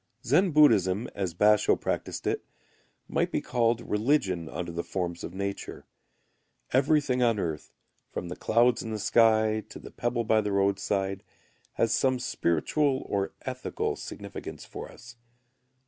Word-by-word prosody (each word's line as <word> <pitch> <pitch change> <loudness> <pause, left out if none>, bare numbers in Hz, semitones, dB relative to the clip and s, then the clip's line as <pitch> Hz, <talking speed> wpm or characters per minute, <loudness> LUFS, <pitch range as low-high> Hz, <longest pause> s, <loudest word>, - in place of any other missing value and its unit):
Zen 175 +10 +4
Buddhism, 115 - +4
as 95 -5 -3
Basho[u] 105 +2 +4
practised - - -3
it, - - -1 0.6
may - - +1
be - - -2
called 120 -1 +1
religion 105 - 0
under 85 -1 -5
the 85 +1 -3
forms 85 -2 -4
of 90 - -7
nature. 100 0 -5 0.9
Everything 135 -1 +3
on 115 -3 +3
earth, 80 -6 -4 0.4
from 90 - -5
the 90 - -5
clouds 120 +2 +3
in 115 - -6
the 110 - -3
sky 110 0 +3
to - - -9
the - - -11
pebble 120 0 -1
by 110 0 +3
the 105 -1 -2
roadside, 100 0 0 0.5
has 115 0 +1
some 130 -1 +2
spiritual 130 - 0
or 100 -1 -1
ethical 130 -1 -3
significance - - -8
for - - -8
us. 120 0 -14
110 Hz, 145 wpm, -28 LUFS, 95-125 Hz, 0.9 s, Zen